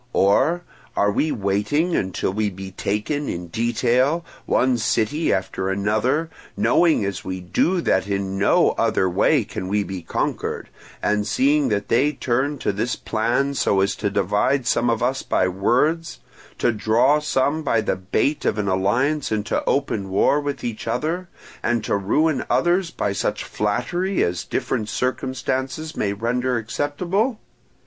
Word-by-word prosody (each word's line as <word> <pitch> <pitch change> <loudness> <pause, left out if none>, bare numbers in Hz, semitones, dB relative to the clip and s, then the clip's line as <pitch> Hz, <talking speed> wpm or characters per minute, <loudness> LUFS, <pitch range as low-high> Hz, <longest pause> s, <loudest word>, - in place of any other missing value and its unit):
Or, 140 - +3 0.3
are 100 0 +3
we 155 +9 0
waiting 105 - 0
until 95 0 -1
we 105 0 0
be 95 0 -8
taken 110 +11 -2
in 85 0 -5
detail, 125 - +1 0.2
one 125 -1 +2
city 115 +7 +1
after 95 0 -1
another; 110 +11 0 0.3
knowing 165 - +3
as 100 -1 -4
we 95 0 -4
do 170 - +1
that 95 - +1
in 100 -1 -2
no 100 - +4
other 95 - +2
way 105 - +3
can 100 -2 -6
we 105 +2 +1
be 95 -2 -6
conquered, 80 - -3 0.3
and 105 0 +1
seeing 140 +5 +2
that 100 -1 -1
they 140 +6 +2
turn 135 +2 -1
to - - -1
this 110 +5 -2
plan, 120 +5 0
so 100 -7 +1
as 100 - +1
to 105 - -1
divide 125 +6 +1
some 120 0 +2
of 115 0 0
us 130 +2 0
by 90 - +1
words, 125 - 0 0.4
to - - +2
draw 115 +7 +3
some 150 +1 0
by 115 -7 +1
the - - 0
bait 100 +10 -1
of - - 0
an 105 -1 -1
alliance 120 +11 +1
into 105 -1 -1
open 105 -8 0
war 100 +9 +3
with 145 -1 -4
each 115 -1 -4
other, 160 +10 -2 0.3
and 120 -2 0
to - - 0
ruin 145 +11 +1
others 175 +1 +2
by 100 -10 -2
such - - -2
flattery 175 - -1
as 85 0 -1
different 105 -2 -2
circumstances 130 +4 -2
may 100 - 0
render 120 +4 -1
acceptable? 175 - -1
120 Hz, 155 wpm, -22 LUFS, 100-145 Hz, 0.4 s, no